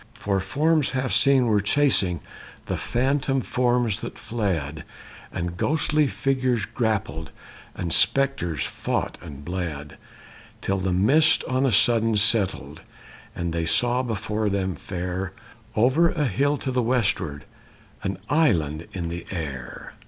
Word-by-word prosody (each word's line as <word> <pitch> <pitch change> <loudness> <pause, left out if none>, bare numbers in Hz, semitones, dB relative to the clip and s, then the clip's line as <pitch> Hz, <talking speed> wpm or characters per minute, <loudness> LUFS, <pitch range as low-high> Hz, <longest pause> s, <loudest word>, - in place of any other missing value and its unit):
For 100 -1 -1
forms 150 - +1
half 130 0 -1
seen 135 -2 +4
were 105 -3 +3
chasing 100 - +2 0.4
The - - -2
phantom 135 +2 0
forms 120 0 +1
that - - -7
fled; 80 -10 -2 0.5
And 85 0 -4
ghostly 150 - +2
figures 130 -4 0
grappled 110 -9 -2 0.5
And 85 -2 -2
spectres 130 - +2
fought - - -3
and 70 -1 -10
bled; 80 -5 -5 0.7
Till 95 0 0
the 95 0 -1
mist 140 - +4
on 130 +1 +1
a - - +2
sudden 115 +2 +3
settled 100 -1 +1 0.5
And 85 -1 -3
they 85 -1 -1
saw 120 +9 +2
before 110 -3 -2
them 95 -1 -1
fair, 90 +2 -4 0.4
Over 135 +9 +4
a 150 -3 0
hill 140 +5 +1
to 135 - -3
the 125 -1 +1
westward, 105 - 0 0.6
An 95 -1 -3
island 85 - +1
in 85 -3 -3
the 85 0 -6
air. 70 -9 -6
105 Hz, 130 wpm, -24 LUFS, 90-130 Hz, 0.7 s, seen